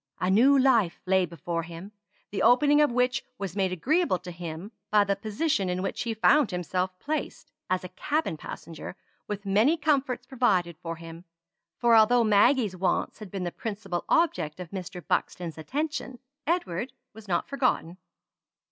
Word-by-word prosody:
A 180 - +1
new 260 +8 +6
life 235 -10 +3
lay 190 -1 +3
before 170 +1 -4
him, 170 +4 -9 0.4
the 200 - -2
opening 290 +4 +5
of 295 - +3
which 250 +2 +1
was 195 -4 -5
made 190 -2 +1
agreeable 290 - +1
to 180 +1 -9
him, 170 +3 -7 0.2
by 210 -1 +5
the 200 0 0
position 210 - -1
in 180 +1 -2
which - - -3
he 230 -2 -2
found 280 +4 +4
himself 185 0 -2
placed, 305 +9 -4 0.2
as 185 0 0
a 180 - -7
cabin 300 - -1
passenger; 165 +3 -8 0.3
with 205 -1 -5
many 215 +12 +3
comforts 275 -5 0
provided 200 - +1
for 165 -1 -4
him; 165 +1 -11 0.5
for 235 -1 +4
although 230 +2 +6
Maggie's 215 0 +4
wants 185 +5 -1
had 210 -3 -8
been 190 0 -4
the 175 - -2
principal 200 -5 -4
object 170 - +1
of 180 -3 -8
Mr. 180 -2 -7
Buxton's 175 -3 -2
attention, 280 - -3 0.3
Edward 260 - -1 0.2
was 220 0 -13
not 175 -2 0
forgotten. 250 -11 0
200 Hz, 165 wpm, -27 LUFS, 180-250 Hz, 0.5 s, new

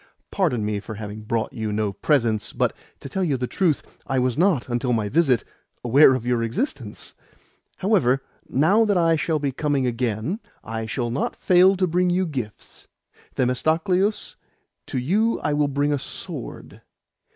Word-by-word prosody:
Pardon 140 - 0
me 105 -1 -1
for 110 +2 -8
having 105 0 -7
brought 110 +1 -2
you 110 -1 -3
no 105 -1 -1
presents, 115 -1 +1
but, - - +1 0.3
to - - -7
tell 190 +8 -2
you 145 -7 +1
the 125 - -2
truth, 160 +2 0 0.2
I 135 - 0
was 125 -1 +1
not, 170 -7 +2
until 120 0 0
my 110 -3 0
visit, 135 -4 +3 0.4
aware 130 +3 +6
of 125 -2 -4
your 120 -1 +1
existence. 115 - -3 0.6
However, 135 - +2 0.3
now 185 - +4
that 205 -3 +2
I 165 -1 +4
shall 160 0 0
be 140 -2 -1
coming 140 -1 0
again, 120 - -1 0.2
I 115 0 -4
will 120 -2 -1
not 130 - -2
fail 185 +1 +5
to 185 - +2
bring 180 +1 +1
you 185 +1 +1
gifts. 125 - -7 0.5
Themistocleus, 165 - +1 0.5
to - - -3
you 205 - +1
I 150 - 0
will 145 0 +2
bring 145 +1 0
a 145 - 0
sword. - - -8
135 Hz, 165 wpm, -23 LUFS, 115-175 Hz, 0.6 s, aware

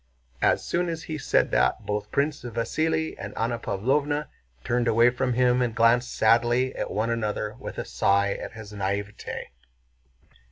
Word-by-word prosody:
As - - +2
soon 175 0 0
as 165 0 -4
he 155 -3 -5
said - - +2
this - - +4
both 105 0 -3
Prince 145 +1 0
Vasíli 155 +7 -1
and 100 +1 -7
Anna 115 +1 -1
Pávlovna 145 +9 0 0.3
turned 120 0 0
away 115 +2 +5
from 125 0 -1
him 125 0 +3
and 120 -2 -1
glanced 120 +2 +3
sadly 120 +3 +3
at - - -3
one 110 +3 -1
another 105 -2 -2
with - - -7
a - - -3
sigh 100 +11 +2
at - - -7
his 110 -2 -10
naïveté. 100 +1 -3
120 Hz, 160 wpm, -26 LUFS, 105-130 Hz, 0.3 s, away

